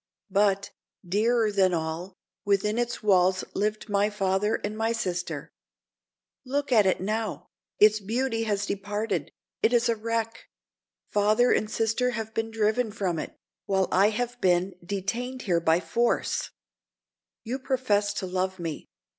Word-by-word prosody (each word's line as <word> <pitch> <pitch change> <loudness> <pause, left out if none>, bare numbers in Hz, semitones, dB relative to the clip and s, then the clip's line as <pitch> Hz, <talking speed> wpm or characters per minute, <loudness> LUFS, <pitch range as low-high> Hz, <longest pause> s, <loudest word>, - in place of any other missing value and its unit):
But, 200 0 +2 0.4
dearer 220 +3 +2
than 190 -3 +3
all, 165 +3 -4 0.3
within 205 +3 +1
its 240 -1 -2
walls 185 -2 +3
lived 210 +2 -1
my 205 0 +2
father 200 +1 0
and 210 - -3
my 225 +1 0
sister. 180 -5 -3 0.9
Look 280 +1 -2
at 215 -5 +5
it 185 - +2
now! 215 +3 -3 0.3
Its 215 0 +6
beauty 225 +3 -1
has 205 -2 0
departed—it 205 +3 -2
is 240 0 +3
a 230 - +2
wreck; 225 0 -3 0.7
father 215 +4 +3
and 215 - +1
sister 225 +3 +1
have 220 0 -5
been 225 0 -1
driven 220 +1 +1
from 185 -6 -2
it, - - -7 0.3
while 190 -1 +2
I 195 +3 +5
have 245 +2 -3
been 180 +1 +2
detained 230 +8 -3
here 175 -4 +2
by 165 0 +3
force. 235 +7 0 0.9
You 245 +4 -3
profess 240 -7 +1
to 190 - -2
love 185 +1 -2
me. 165 -4 -5
210 Hz, 140 wpm, -27 LUFS, 190-225 Hz, 0.9 s, Its